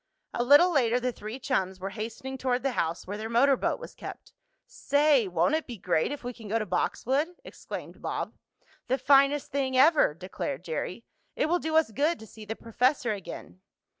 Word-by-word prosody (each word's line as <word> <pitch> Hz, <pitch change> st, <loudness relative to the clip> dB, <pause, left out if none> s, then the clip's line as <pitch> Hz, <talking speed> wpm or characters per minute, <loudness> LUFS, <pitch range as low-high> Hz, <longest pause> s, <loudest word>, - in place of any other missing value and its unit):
A 240 Hz, -, 0 dB
little 290 Hz, +8 st, +7 dB
later 245 Hz, -4 st, +3 dB
the 250 Hz, 0 st, -1 dB
three 215 Hz, +1 st, -7 dB
chums 190 Hz, -8 st, -1 dB
were 195 Hz, +1 st, -4 dB
hastening 230 Hz, +5 st, -6 dB
toward 255 Hz, -1 st, -1 dB
the 270 Hz, -, +1 dB
house 165 Hz, -7 st, -2 dB
where 205 Hz, +3 st, -5 dB
their 220 Hz, +1 st, -4 dB
motor 265 Hz, +4 st, +4 dB
boat -, -, -1 dB
was -, -, -9 dB
kept. -, -, -10 dB, 0.3 s
"Say! 285 Hz, -5 st, +2 dB
won't 180 Hz, -, +1 dB
it 315 Hz, 0 st, 0 dB
be 240 Hz, -3 st, -7 dB
great 180 Hz, -, 0 dB
if 290 Hz, -, -6 dB
we 245 Hz, +1 st, -4 dB
can 225 Hz, -3 st, -11 dB
go 220 Hz, +3 st, +1 dB
to 220 Hz, -, -2 dB
Boxwood?" 265 Hz, -, 0 dB
exclaimed -, -, -8 dB
Bob. -, -, -3 dB, 0.5 s
"The 260 Hz, -, +1 dB
finest 275 Hz, +1 st, +4 dB
thing 265 Hz, -2 st, 0 dB
ever!" 290 Hz, -, +5 dB
declared 175 Hz, -3 st, -5 dB
Jerry. 180 Hz, +6 st, -4 dB, 0.3 s
"It -, -, +1 dB
will 345 Hz, +3 st, +1 dB
do 315 Hz, -1 st, -2 dB
us 320 Hz, -7 st, +4 dB
good 300 Hz, +8 st, +1 dB
to 220 Hz, -, -11 dB
see 220 Hz, 0 st, -12 dB
the 225 Hz, -, -4 dB
professor 245 Hz, +2 st, 0 dB
again." 165 Hz, -, -9 dB
245 Hz, 195 wpm, -28 LUFS, 205-280 Hz, 0.5 s, little